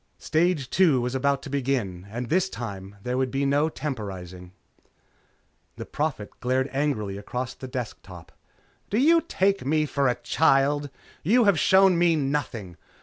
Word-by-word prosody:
Stage 160 Hz, -3 st, 0 dB
two 165 Hz, -9 st, +4 dB
was 125 Hz, +1 st, -2 dB
about 140 Hz, +1 st, 0 dB
to -, -, -7 dB
begin, 120 Hz, -10 st, -2 dB
and 120 Hz, +3 st, -5 dB
this 185 Hz, +6 st, +1 dB
time 100 Hz, -, -7 dB
there 125 Hz, +1 st, -1 dB
would 130 Hz, -1 st, 0 dB
be 135 Hz, +2 st, -1 dB
no 145 Hz, +3 st, +2 dB
temporizing. 95 Hz, -, -6 dB, 1.2 s
The -, -, -7 dB
Prophet 145 Hz, -9 st, -3 dB
glared 130 Hz, +2 st, 0 dB
angrily 110 Hz, -9 st, -1 dB
across 125 Hz, +5 st, -4 dB
the 130 Hz, -, -9 dB
desk 125 Hz, -4 st, -5 dB
top. 90 Hz, -3 st, -13 dB, 0.6 s
"Do 205 Hz, -, 0 dB
you 330 Hz, +6 st, +5 dB
take 195 Hz, -, 0 dB
me 155 Hz, +3 st, +1 dB
for 140 Hz, -2 st, 0 dB
a 125 Hz, -, +2 dB
child? 145 Hz, +2 st, +2 dB, 0.3 s
You 235 Hz, +9 st, +4 dB
have 200 Hz, -7 st, +3 dB
shown 190 Hz, -1 st, +5 dB
me 170 Hz, -1 st, +4 dB
nothing. 135 Hz, -, -3 dB
135 Hz, 155 wpm, -25 LUFS, 120-155 Hz, 1.2 s, you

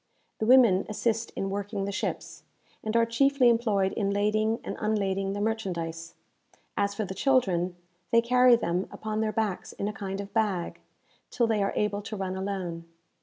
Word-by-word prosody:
The 220 Hz, -, -1 dB
women 235 Hz, -7 st, +6 dB
assist 225 Hz, +1 st, -1 dB
in 195 Hz, 0 st, -2 dB
working 200 Hz, 0 st, -3 dB
the 200 Hz, -, -3 dB
ships, 200 Hz, -, -4 dB, 0.4 s
and 220 Hz, +1 st, 0 dB
are 230 Hz, -, +4 dB
chiefly 260 Hz, +2 st, +3 dB
employed 215 Hz, -5 st, +2 dB
in 200 Hz, -2 st, -1 dB
lading 215 Hz, +2 st, +1 dB
and -, -, -5 dB
unlading 195 Hz, -2 st, 0 dB
the 205 Hz, -, -3 dB
merchandise. 170 Hz, -7 st, -3 dB, 0.6 s
As 200 Hz, 0 st, 0 dB
for 215 Hz, -, -2 dB
the 190 Hz, -, -5 dB
children, 190 Hz, -9 st, +1 dB, 0.3 s
they 230 Hz, -, +5 dB
carry 250 Hz, +1 st, +5 dB
them 180 Hz, -4 st, -1 dB
upon 215 Hz, 0 st, -3 dB
their 220 Hz, -1 st, 0 dB
backs 215 Hz, -3 st, -2 dB
in 200 Hz, -, -3 dB
a 210 Hz, -, -3 dB
kind 195 Hz, -1 st, -5 dB
of 200 Hz, 0 st, -7 dB
bag, 205 Hz, -6 st, -1 dB, 0.5 s
till 240 Hz, -, +1 dB
they 220 Hz, -2 st, +1 dB
are 195 Hz, -, 0 dB
able 210 Hz, -1 st, 0 dB
to 205 Hz, +1 st, -6 dB
run 190 Hz, -1 st, -3 dB
alone. 190 Hz, -4 st, -4 dB
205 Hz, 175 wpm, -28 LUFS, 195-225 Hz, 0.6 s, women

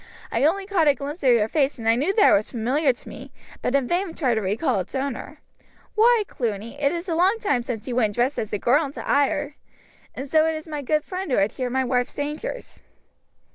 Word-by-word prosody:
"I -, -, 0 dB
only 385 Hz, +5 st, +1 dB
caught 375 Hz, -6 st, +2 dB
a 285 Hz, -, +5 dB
glimpse 290 Hz, +5 st, -6 dB
of 265 Hz, -, +3 dB
your 230 Hz, -3 st, +4 dB
face 280 Hz, +2 st, 0 dB
and 225 Hz, -, -8 dB
knew 310 Hz, +8 st, +1 dB
that 415 Hz, -, +6 dB
it -, -, +6 dB
was 205 Hz, +1 st, +2 dB
familiar 260 Hz, +5 st, +1 dB
to 245 Hz, -, -13 dB
me, -, -, -10 dB, 0.3 s
but 255 Hz, -, 0 dB
in 275 Hz, -3 st, +2 dB
vain 350 Hz, +1 st, -1 dB
tried 260 Hz, -6 st, +1 dB
to 220 Hz, -, 0 dB
recall 200 Hz, +4 st, 0 dB
its 185 Hz, -, -6 dB
owner. 270 Hz, 0 st, -4 dB, 0.5 s
Why, 455 Hz, 0 st, +4 dB
Cluny, 230 Hz, +3 st, -4 dB
it 280 Hz, -1 st, +3 dB
is 345 Hz, +2 st, -4 dB
a 340 Hz, -, -1 dB
long 370 Hz, +7 st, +3 dB
time 395 Hz, -, +1 dB
since 235 Hz, -1 st, -5 dB
you 245 Hz, -, -3 dB
went 215 Hz, -4 st, +1 dB
dressed 250 Hz, +4 st, +1 dB
as 215 Hz, -, -4 dB
a 210 Hz, -, 0 dB
girl 265 Hz, +9 st, +3 dB
into 280 Hz, +1 st, -7 dB
Ayr! 290 Hz, +1 st, +1 dB, 0.6 s
And 270 Hz, +2 st, -5 dB
so 315 Hz, +2 st, +3 dB
it 320 Hz, -, 0 dB
is 310 Hz, +1 st, -7 dB
my 300 Hz, -2 st, -4 dB
good 300 Hz, +3 st, 0 dB
friend 375 Hz, -1 st, -5 dB
who 255 Hz, -, +1 dB
had 200 Hz, +2 st, +2 dB
shared 255 Hz, -2 st, -4 dB
my 265 Hz, 0 st, +2 dB
wife's 245 Hz, 0 st, -1 dB
dangers." 300 Hz, +13 st, -5 dB
280 Hz, 235 wpm, -23 LUFS, 245-320 Hz, 0.6 s, that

